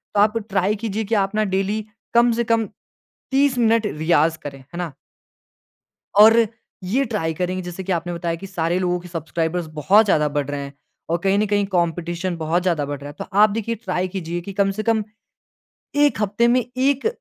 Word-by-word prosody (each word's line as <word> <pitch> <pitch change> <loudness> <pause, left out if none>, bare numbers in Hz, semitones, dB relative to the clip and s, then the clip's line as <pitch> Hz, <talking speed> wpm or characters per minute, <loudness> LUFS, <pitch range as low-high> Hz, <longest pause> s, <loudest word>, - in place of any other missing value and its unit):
तो - - +3
आप 215 +2 +3
ट्राई 195 +1 +1
कीजिए 220 0 -3
कि 225 +3 0
आप 195 0 0
ना 215 - +2
डेली 205 +3 -1 0.3
कम 235 0 +5
से 235 +1 0
कम 230 -1 +1 0.7
30 270 -1 +2
मिनट 230 -2 +3
रियाज़ 160 -1 +1
करें, 140 -3 -7
है 145 +7 -11
ना? 175 -4 -3 1.3
और 225 +2 +9 0.5
ये 250 +9 +1
ट्राई 200 -9 -2
करेंगे 185 +2 -2
जैसे 175 +1 -6
कि 195 - -1
आपने 175 0 -2
बताया 170 -1 -2
कि 195 - -9
सारे 175 -2 -1
लोगों 180 -1 0
के 180 - -11
सब्सक्राइबर्स 165 +1 -2
बहुत 200 +9 +5
ज़्यादा 150 -7 +2
बढ़ 145 -1 -2
रहे 145 0 -3
हैं 140 0 -7 0.4
और 170 - +2
कहीं 195 +1 +3
न 215 - +2
कहीं 205 0 +1
कॉम्पटिशन 175 +1 -1
बहुत 165 +2 0
ज़्यादा 170 -6 +1
बढ़ 145 -1 -4
रहा 145 - -8
है। - - -12
तो - - -4
आप 210 +1 +7
देखिए 225 +2 -2
ट्राई 185 -4 -2
कीजिए 175 -2 -4
कि 195 +3 -8
कम 195 0 +3
से 215 +2 -3
कम, 225 -1 +2 0.9
1 290 -6 +3
हफ्ते 210 +4 +2
में 245 0 +3
1 275 - +1
190 Hz, 200 wpm, -21 LUFS, 170-220 Hz, 1.3 s, और